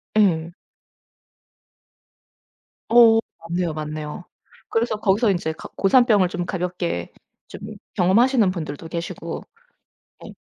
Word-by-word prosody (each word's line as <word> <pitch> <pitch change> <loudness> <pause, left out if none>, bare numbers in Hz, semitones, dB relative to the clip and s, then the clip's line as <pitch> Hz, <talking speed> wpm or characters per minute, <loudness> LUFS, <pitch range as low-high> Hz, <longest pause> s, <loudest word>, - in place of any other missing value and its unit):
예. 170 -6 +2 2.4
어 230 -1 +7 0.3
맞네요. 175 -1 -1
맞네요. 155 +1 -6 0.5
그래서 225 -1 0
거기서 210 +1 +2
인제 165 -3 -2
가 - - -11
고산병을 205 -3 +4
좀 180 -1 -3
가볍게 175 - -3 0.4
좀 - - -10 0.4
경험하시는 215 +4 +4
분들도 160 -3 -6
계시고 170 0 -5 0.8
네 - - -10
180 Hz, 220 characters per minute, -22 LUFS, 165-215 Hz, 2.4 s, 어